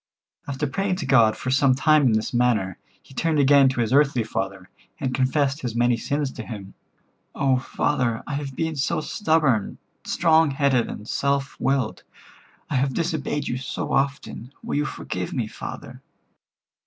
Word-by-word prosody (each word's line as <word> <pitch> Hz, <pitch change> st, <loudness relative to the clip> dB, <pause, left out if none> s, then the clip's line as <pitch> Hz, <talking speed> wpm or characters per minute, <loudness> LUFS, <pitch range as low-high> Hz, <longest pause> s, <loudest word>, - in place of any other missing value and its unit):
After 140 Hz, +1 st, -2 dB
praying 185 Hz, +7 st, -1 dB
to 180 Hz, -5 st, -4 dB
God 115 Hz, -5 st, +4 dB
for 130 Hz, -, -3 dB
some 135 Hz, -1 st, +4 dB
time 150 Hz, 0 st, +4 dB
in 115 Hz, -, +3 dB
this 110 Hz, +3 st, -1 dB
manner, 115 Hz, -7 st, +1 dB, 0.2 s
he -, -, -17 dB
turned 160 Hz, +3 st, 0 dB
again 140 Hz, -1 st, +6 dB
to 125 Hz, -2 st, -1 dB
his 115 Hz, +1 st, 0 dB
earthly 140 Hz, -4 st, +3 dB
father, 95 Hz, -3 st, -4 dB, 0.3 s
and 130 Hz, -2 st, -2 dB
confessed 135 Hz, +2 st, +1 dB
his 120 Hz, -3 st, -4 dB
many 120 Hz, 0 st, +3 dB
sins 140 Hz, +3 st, -2 dB
to 115 Hz, -, -7 dB
him. 105 Hz, -4 st, -8 dB, 0.6 s
"Oh, 135 Hz, -2 st, +2 dB
father, 125 Hz, -3 st, -1 dB
I 150 Hz, -, -5 dB
have 140 Hz, -2 st, -4 dB
been 160 Hz, +1 st, -2 dB
so 135 Hz, -, 0 dB
stubborn, 155 Hz, -, +1 dB, 0.3 s
strong 160 Hz, -2 st, +3 dB
headed 135 Hz, -3 st, +1 dB
and 105 Hz, -, -8 dB
self 140 Hz, +1 st, -1 dB
willed. 130 Hz, -3 st, 0 dB, 0.7 s
I -, -, -1 dB
have 130 Hz, 0 st, 0 dB
disobeyed 155 Hz, -3 st, -2 dB
you 125 Hz, -, -2 dB
so 130 Hz, -, -4 dB
often. 135 Hz, -3 st, -2 dB
Will -, -, -2 dB
you 150 Hz, -, +1 dB
forgive -, -, -5 dB
me, -, -, -1 dB
father?" -, -, -8 dB
135 Hz, 165 wpm, -24 LUFS, 120-145 Hz, 0.7 s, again